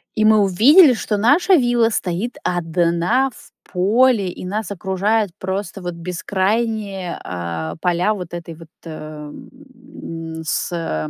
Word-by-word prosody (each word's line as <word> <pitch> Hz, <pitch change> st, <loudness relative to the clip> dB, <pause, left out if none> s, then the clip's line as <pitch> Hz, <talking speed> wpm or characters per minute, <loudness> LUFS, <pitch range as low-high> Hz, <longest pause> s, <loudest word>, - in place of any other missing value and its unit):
И 215 Hz, -2 st, +2 dB
мы 215 Hz, 0 st, +6 dB
увидели, 250 Hz, -, +6 dB
что 220 Hz, -2 st, -2 dB
наша 290 Hz, -, +4 dB
вилла 240 Hz, -5 st, +3 dB
стоит 195 Hz, +2 st, -3 dB
одна 175 Hz, +8 st, +1 dB
в -, -, -17 dB, 0.2 s
поле, 205 Hz, +2 st, +3 dB
и 180 Hz, -, -8 dB
нас 210 Hz, +4 st, -3 dB
окружают 200 Hz, +2 st, 0 dB
просто 190 Hz, 0 st, -4 dB
вот 175 Hz, -1 st, -5 dB
бескрайние, 195 Hz, +2 st, -2 dB
а, 85 Hz, -2 st, -5 dB
поля 180 Hz, +4 st, +1 dB
вот 180 Hz, -4 st, -7 dB
этой 170 Hz, -1 st, -6 dB
вот, 165 Hz, 0 st, -14 dB, 0.2 s
э, 165 Hz, -, -7 dB, 1.1 s
м, 165 Hz, 0 st, -6 dB
сэ 155 Hz, -, -2 dB
190 Hz, 130 wpm, -20 LUFS, 170-220 Hz, 1.1 s, мы